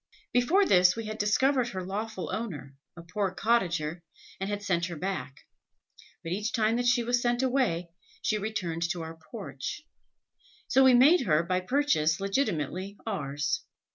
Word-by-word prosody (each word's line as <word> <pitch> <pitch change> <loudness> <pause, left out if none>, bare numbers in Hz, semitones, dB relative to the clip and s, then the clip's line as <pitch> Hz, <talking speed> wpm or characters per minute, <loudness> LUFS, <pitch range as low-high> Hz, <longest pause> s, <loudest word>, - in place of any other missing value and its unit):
Before 325 +12 +4
this 180 - +5
we 225 -1 -5
had 215 0 -6
discovered 255 +5 +2
her 185 -5 -5
lawful 205 +1 -4
owner, 145 - -5 0.2
a 170 - -9
poor 195 +3 -1
cottager, 175 -6 0 0.4
and 195 +1 -3
had 205 0 -3
sent 175 -3 0
her 175 - -6
back; 180 -5 -4 0.8
but 165 - -5
each 210 +5 -2
time 220 0 +2
that 245 0 0
she 245 -1 +3
was 245 +1 +1
sent 240 +1 +1
away, 245 -11 0 0.3
she 215 - 0
returned 195 -6 -3
to 175 -2 -3
our 160 0 -9
porch; 140 - -6 0.8
so 265 - +4
we 260 -1 +7
made 270 - +5
her 155 -1 +3
by 185 +1 0
purchase 185 - +1
legitimately 195 - -2
ours. 145 -8 -2
200 Hz, 160 wpm, -28 LUFS, 170-240 Hz, 0.8 s, we